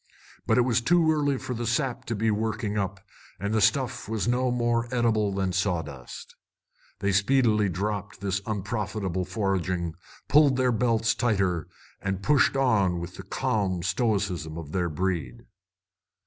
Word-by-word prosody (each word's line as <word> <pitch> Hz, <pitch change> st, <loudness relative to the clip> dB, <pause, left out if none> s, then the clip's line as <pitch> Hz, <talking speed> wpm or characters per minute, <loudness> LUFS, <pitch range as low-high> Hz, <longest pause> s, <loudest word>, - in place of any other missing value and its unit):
But -, -, +3 dB
it -, -, +6 dB
was 120 Hz, -1 st, +2 dB
too 165 Hz, +4 st, +4 dB
early 145 Hz, -3 st, +1 dB
for 130 Hz, 0 st, -5 dB
the 120 Hz, -1 st, -3 dB
sap 125 Hz, +1 st, -1 dB
to 115 Hz, -, -2 dB
be 110 Hz, +1 st, +1 dB
working 110 Hz, 0 st, -2 dB
up, 95 Hz, -2 st, -2 dB, 0.4 s
and 100 Hz, +2 st, -2 dB
the 110 Hz, -, +2 dB
stuff 125 Hz, -1 st, +1 dB
was 110 Hz, -1 st, -1 dB
no 125 Hz, +1 st, +2 dB
more 120 Hz, -1 st, +1 dB
eatable 115 Hz, -4 st, +1 dB
than 95 Hz, -1 st, -1 dB
sawdust. 80 Hz, -9 st, -3 dB, 0.7 s
They 100 Hz, -, +1 dB
speedily 105 Hz, 0 st, +3 dB
dropped 100 Hz, +2 st, -3 dB
this 100 Hz, 0 st, -1 dB
unprofitable 100 Hz, -3 st, -2 dB
foraging, 90 Hz, -3 st, -1 dB, 0.3 s
pulled 145 Hz, -2 st, +5 dB
their 130 Hz, -1 st, +3 dB
belts 115 Hz, -1 st, +2 dB
tighter, 95 Hz, -8 st, 0 dB, 0.3 s
and 95 Hz, 0 st, -3 dB
pushed 140 Hz, 0 st, +3 dB
on 100 Hz, -10 st, +2 dB
with 85 Hz, +1 st, -6 dB
the -, -, -8 dB
calm 95 Hz, -5 st, -1 dB
stoicism 95 Hz, -5 st, -1 dB
of 80 Hz, -3 st, -7 dB
their 90 Hz, -1 st, 0 dB
breed. 80 Hz, -5 st, -3 dB
105 Hz, 150 wpm, -26 LUFS, 95-120 Hz, 0.7 s, it